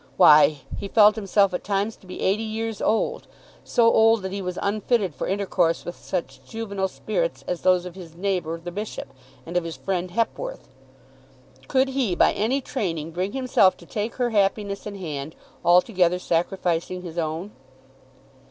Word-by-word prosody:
Why; 150 -4 +7 0.2
he 200 - -4
felt 210 +1 +6
himself 200 -2 +2
at 180 - -3
times 205 +2 -1
to 185 - -19
be 180 - -8
eighty 200 +3 +1
years 225 -1 -4
old, 225 - 0 0.4
so 240 - +2
old 225 -1 +4
that 190 - -4
he 200 0 -4
was 180 -1 -4
unfitted 205 -2 0
for 130 - -4
intercourse 185 -4 0
with 175 - -5
such 180 -3 -5
juvenile 200 -4 -3
spirits - - -3
as 180 - -2
those 180 -1 +3
of 180 - -7
his 170 -3 -11
neighbour 175 -3 -2
the 175 +1 -7
bishop, 205 +4 -5 0.4
and 170 - -8
of 180 - +2
his 165 -1 -6
friend 185 -2 -2
Hepworth. 235 - -3 1.0
Could 265 0 +2
he, 260 -9 0
by - - +4
any 250 +7 0
training, 165 - -3
bring 185 +5 -3
himself 255 -8 +3
to 170 - -15
take 210 +6 -4
her 245 -2 0
happiness 200 -1 0
in 205 - -6
hand, 155 -5 -6 0.3
altogether 180 0 +4
sacrificing 175 0 -1
his 170 -1 -5
own? 165 +5 -3
190 Hz, 170 wpm, -24 LUFS, 175-215 Hz, 1.0 s, Why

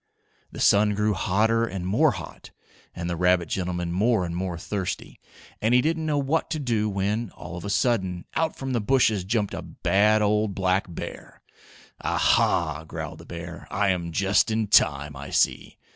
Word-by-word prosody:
The - - -9
sun 105 0 +4
grew 105 +1 +1
hotter 110 +4 +1
and 95 -6 -3
more 120 +12 +3
hot, 85 -4 -9 0.5
and 85 - -4
the 85 - -2
rabbit 90 0 +2
gentleman 90 -2 -2
more 105 +1 +2
and 85 0 -5
more 90 -1 -3
thirsty, 95 +2 -4 0.4
and 115 +3 +3
he 125 - +6
didn't 160 0 0
know 150 -1 +1
what 140 +3 0
to 160 -1 -2
do 115 -6 0
when, 105 +3 -1
all 90 - -8
of 90 - -7
a - - -3
sudden, 95 -5 0
out 160 0 0
from 135 -1 -4
the 120 - +1
bushes 110 -4 +2
jumped 105 +1 -1
a - - -4
bad 105 +5 +2
old 105 -1 +1
black 95 0 +1
bear. - - -8 0.6
"Ah, - - 0
ha!" 80 -2 +2
growled 80 - -7
the - - -13
bear. - - -8
"I 100 0 +1
am 85 -2 -1
just 95 +7 +2
in 110 -2 -1
time, 70 +1 +3
I 70 0 -8
see!" - - 0
100 Hz, 185 wpm, -25 LUFS, 90-115 Hz, 0.6 s, he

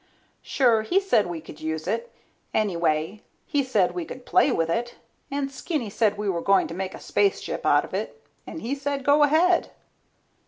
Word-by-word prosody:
Sure 240 -5 +2
he 350 - +2
said 380 - +2
we 175 -2 -4
could 155 -1 -12
use 160 0 -3
it. 485 +1 -2 0.4
Anyway 170 -1 0 0.2
he 290 -2 0
said 205 -9 +2
we 180 -1 -3
could 250 +8 -10
play 280 - +3
with 165 -7 +1
it, 235 +7 -2 0.3
and 275 -1 -2
Skinny 270 - -3
said 210 -1 +1
we 210 0 -3
were 175 -3 0
going 195 +2 +3
to - - -6
make 190 +1 -4
a - - -10
spaceship 400 -1 0
out - - +4
of - - -15
it, - - -4 0.3
and 320 - -7
he 240 +4 -2
said 280 -1 -3
go 285 +1 +5
ahead. 325 +5 +4
225 Hz, 190 wpm, -25 LUFS, 180-285 Hz, 0.4 s, go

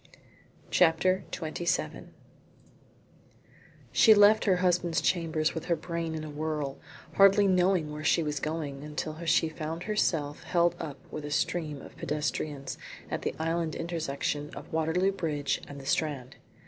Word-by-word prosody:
CHAPTER 180 +2 +3
XXVII 170 0 -2 1.8
She 220 -3 +7
left 205 +1 +6
her 190 -3 +4
husband's 180 -2 +1
chambers 160 -3 +1
with 160 - -5
her 170 - +2
brain 165 0 -4
in 155 - -4
a 155 - -6
whirl, 150 -2 -3 0.4
hardly 195 +1 +7
knowing 180 -4 +2
where 150 +1 -6
she 165 +1 +3
was 150 -2 -2
going 150 -2 -4
until 155 +2 -5
she 165 0 +3
found 160 +1 -5
herself 160 -9 0
held 175 -1 +2
up 145 -3 -5
with 155 - -5
a 145 - -5
stream 150 -1 -1
of - - -12
pedestrians 150 -1 -3 0.3
at - - -2
the - - -2
island 165 0 -1
intersection 150 -3 -2
of - - -10
Waterloo 160 +4 +2
Bridge 150 -7 -2
and 140 0 -9
the 135 - -10
Strand. 140 -3 -1
160 Hz, 145 wpm, -29 LUFS, 150-175 Hz, 1.8 s, She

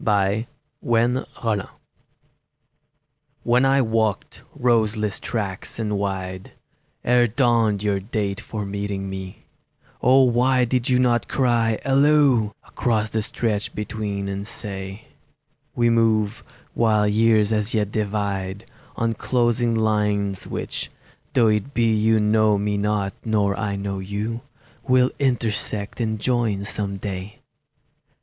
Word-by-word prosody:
BEFORE 105 +2 +1 0.3
KNOWLEDGE 115 -3 0 1.8
WHEN 125 +2 +3
I 135 0 +4
walked 110 -3 -1 0.2
roseless 110 -4 +1
tracks 100 -5 -4
and 105 -2 -2
wide, 95 -2 -4 0.5
Ere 120 0 +4
dawned 115 -4 +2
your 100 -2 +1
date 100 -1 -3
for 105 -2 -5
meeting 100 -1 -4
me, 95 -1 -8 0.6
O 130 +2 +6
why 125 +1 +3
did 125 +1 0
you 125 - +4
not 120 -4 +2
cry 120 -4 +1
Halloo 135 -4 +4 0.2
Across 110 -3 -1
the 110 - 0
stretch 105 -1 -2
between, 105 -2 -3
and 100 +1 -4
say: 95 0 -5 0.7
"We 120 -1 +3
move, 110 -2 +2 0.3
while 110 -2 +2
years 110 0 +3
as 110 +1 0
yet 105 -2 0
divide, 100 -1 -2 0.3
On 115 0 0
closing 120 0 +1
lines 105 -3 0
which—though 120 -3 -2
it 105 +6 0
be 115 -2 +3
You 110 +1 +3
know 105 0 +3
me 105 +1 -1
not 100 -1 0
nor 105 -3 +1
I 100 -2 -2
know 100 0 -3
you— 105 +4 -4 0.5
Will 130 0 +4
intersect 115 -5 -1
and 110 -1 -1
join 115 -4 0
some 100 -1 -2
day!" 95 0 -6
110 Hz, 120 wpm, -23 LUFS, 100-120 Hz, 1.8 s, O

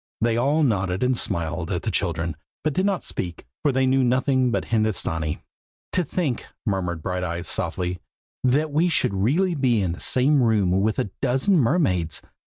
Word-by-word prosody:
They 115 +1 +1
all 140 +6 +2
nodded 95 -5 0
and 125 0 +2
smiled 85 -5 -2
at 90 - -2
the 110 - -1
children, 85 -2 -1 0.3
but 155 - 0
did 185 +6 +1
not 195 -3 -1
speak, 85 -6 -5 0.2
for 145 - +2
they 130 0 +2
knew 130 0 +3
nothing 130 +1 +2
but 120 - -1
Hindostanee. 95 -9 -1 0.5
"To 180 - +2
think," 150 -6 -2 0.2
murmured 90 -5 -2
Brighteyes, 90 -2 -3
softly, 90 0 -2 0.4
"that 145 +4 +2
we 160 +5 +2
should 165 - +1
really 145 - +1
be 130 -7 +2
in 95 -4 0
the 85 - -6
same 135 +2 +3
room 110 -6 +2
with 110 +2 0
a 100 - -1
dozen 135 +8 +2
mermaids! 115 - +1
115 Hz, 175 wpm, -24 LUFS, 90-140 Hz, 0.5 s, knew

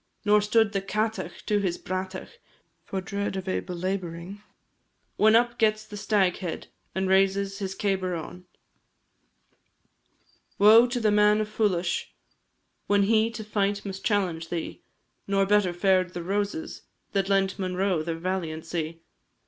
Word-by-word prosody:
Nor 210 0 +5
stood 215 0 +3
the 195 -1 -1
Cátach 210 -2 -3
to 210 -1 +1
his 185 -4 -1
bratach 185 - -6 0.4
For 190 - -4
dread 200 +1 -3
of 190 -1 -5
a 185 - 0
belabouring, 180 +1 -5 0.8
When 220 +1 +5
up 240 +1 +2
gets 215 -1 +2
the 215 -1 -10
Staghead, 195 -4 0 0.3
And 190 0 0
raises 195 +1 +2
his 190 -1 -4
cabar 190 -3 -1
on. 180 +2 -8 2.1
Woe 220 +4 +7
to 245 0 -2
the 215 -2 +2
man 210 0 +4
of 215 0 -4
Folais, 180 -5 0 0.8
When 200 0 +3
he 220 +2 +3
to 225 -1 -7
fight 205 -1 -1
must 195 -1 -6
challenge 180 -7 0
thee; 170 -2 -5 0.5
Nor 195 0 +2
better 205 -2 +3
fared 185 0 +1
the 175 - -4
Roses 205 - -3 0.3
That 195 -1 0
lent 195 -1 +1
Monro 185 -2 0
their 165 +1 -3
valiancy. 165 -2 -4
195 Hz, 140 wpm, -26 LUFS, 185-210 Hz, 2.1 s, Woe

